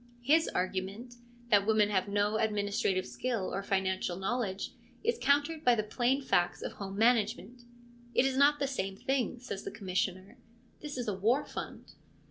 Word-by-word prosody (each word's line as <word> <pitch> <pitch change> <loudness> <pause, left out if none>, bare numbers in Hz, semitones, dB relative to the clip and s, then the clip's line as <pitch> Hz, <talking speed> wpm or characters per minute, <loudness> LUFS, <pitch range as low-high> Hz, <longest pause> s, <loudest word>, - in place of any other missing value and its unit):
His 315 +5 +4
argument, 195 +6 -3 0.3
that 200 -1 +5
women 215 -1 +4
have 190 -1 +1
no 205 +1 +1
administrative 205 -3 0
skill 190 - -3
or 195 - -1
financial 190 -2 -1
knowledge, 195 -1 -2 0.3
is 465 +2 0
countered 290 +3 +2
by 245 -1 +5
the 215 - 0
plain 250 +5 0
facts 175 -8 +1
of - - -3
home 195 -1 -7
management. 235 +1 +1 0.2
' 240 0 -24
It 255 - +4
is 270 -1 +1
not 285 +2 +5
the 285 - 0
same 195 -8 -3
thing/ 260 0 -1
says 235 -5 -6
the - - -4
Commissioner; 190 +3 -3 0.2
' 240 - -32
this 295 -3 -6
is 245 - -3
a 210 - 0
war 225 +9 +1
fund.' - - -8
220 Hz, 175 wpm, -31 LUFS, 195-250 Hz, 0.3 s, that